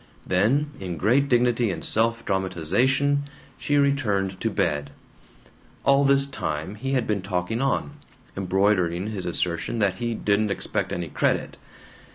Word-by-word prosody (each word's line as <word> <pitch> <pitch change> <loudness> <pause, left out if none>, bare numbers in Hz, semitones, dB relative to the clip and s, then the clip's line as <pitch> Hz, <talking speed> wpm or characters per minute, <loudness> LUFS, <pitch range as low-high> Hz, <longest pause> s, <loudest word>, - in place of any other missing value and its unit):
Then, 120 +11 +2
in 90 -3 -5
great 135 - +2
dignity 120 -2 +3
and 90 - -4
self 115 +1 +1
dramatization, 105 - +1 0.3
she 145 - +1
returned 105 -10 +1
to - - +1
bed. 70 -1 -1 1.0
All 140 0 +5
this 140 0 +4
time 80 - -4
he 135 +6 -4
had 125 -3 +1
been 105 -2 -1
talking 95 +4 -2
on, 135 +1 0 0.4
embroidering 95 0 +1
his 95 -4 -4
assertion 85 +5 -1
that 100 -4 +1
he 120 -1 -2
"didn't 105 0 +1
expect 100 - -2
any 85 -2 -3
credit." - - -1
105 Hz, 140 wpm, -24 LUFS, 95-130 Hz, 1.0 s, All